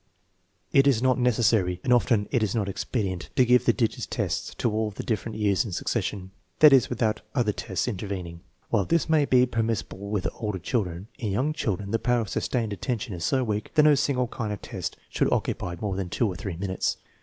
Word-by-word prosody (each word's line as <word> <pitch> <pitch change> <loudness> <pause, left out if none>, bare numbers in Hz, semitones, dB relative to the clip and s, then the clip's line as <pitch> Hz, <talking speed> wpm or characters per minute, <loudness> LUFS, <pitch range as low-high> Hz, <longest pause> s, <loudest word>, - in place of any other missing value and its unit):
It 135 0 +5
is 125 -4 +3
not 130 0 +3
necessary, 110 -7 +2
and 125 -3 +3
often 115 -4 +2
it 125 - +2
is 110 -1 0
not 105 -3 0
expedient, 95 -2 -3
to 130 - +5
give 125 +1 +4
the - - +6
digits 115 -4 -1
tests - - -3
of 115 - +2
all 110 0 0
the 105 - -7
different 110 -1 -3
years 100 -3 +2
in 110 - -6
succession; 95 +2 -2 0.3
that 150 -2 +8
is, 130 - +5
without 115 -3 0
other 120 -5 +2
tests 95 0 -3
intervening. 95 -6 -4 0.3
While 100 - +2
this 165 - +1
may 155 -3 +3
be 125 -2 +5
per 115 -2 -1
missible 105 -3 -3
with 100 -3 -1
older 105 -4 -3
children, 95 -2 -2
in 110 -6 -2
young 135 +9 0
children 100 - -2
the 115 - +1
power 120 -1 +2
of 110 - -5
sustained 115 -5 -1
attention 105 +2 -3
is 85 -2 -5
so 130 +8 +1
weak 105 +2 -3
that 150 - +6
no 150 0 +7
single 135 -2 +1
kind 115 -3 -4
of 105 - -6
test - - -5
should - - 0
occupy 85 -1 -1
more 100 -3 -2
than 95 -2 -3
two 115 - +1
or 95 - -3
three 90 -1 -5
minutes. 95 0 -1
110 Hz, 215 wpm, -26 LUFS, 100-125 Hz, 0.3 s, that